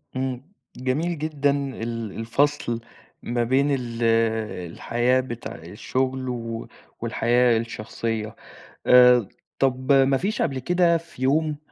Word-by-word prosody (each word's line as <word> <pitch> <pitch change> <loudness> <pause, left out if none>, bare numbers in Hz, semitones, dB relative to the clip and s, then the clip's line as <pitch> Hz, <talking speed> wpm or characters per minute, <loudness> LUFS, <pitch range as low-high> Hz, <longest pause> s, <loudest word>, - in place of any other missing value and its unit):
إمم 130 -1 -2 0.4
جميل 150 +7 -1
جدًا 150 -2 0
ال 115 -6 -3
الفصل 120 +1 0 0.4
ما 120 0 0
بين 130 +4 +2
ال 120 -3 -2 0.7
الحياة 120 +7 +1
بتاع 120 -2 -6
الشغل 130 +10 -3
و 115 -2 -5 0.3
والحياة 120 0 +2
الشخصية. 110 -1 -4 0.5
آآ، 125 -3 +7 0.3
طَب 130 0 +1
ما 135 0 +5
فيش 205 +8 -2
قبل 135 -4 0
كده 175 +4 +3
في 165 -5 -13
يوم 150 +3 +1
130 Hz, 115 wpm, -24 LUFS, 115-140 Hz, 0.7 s, آآ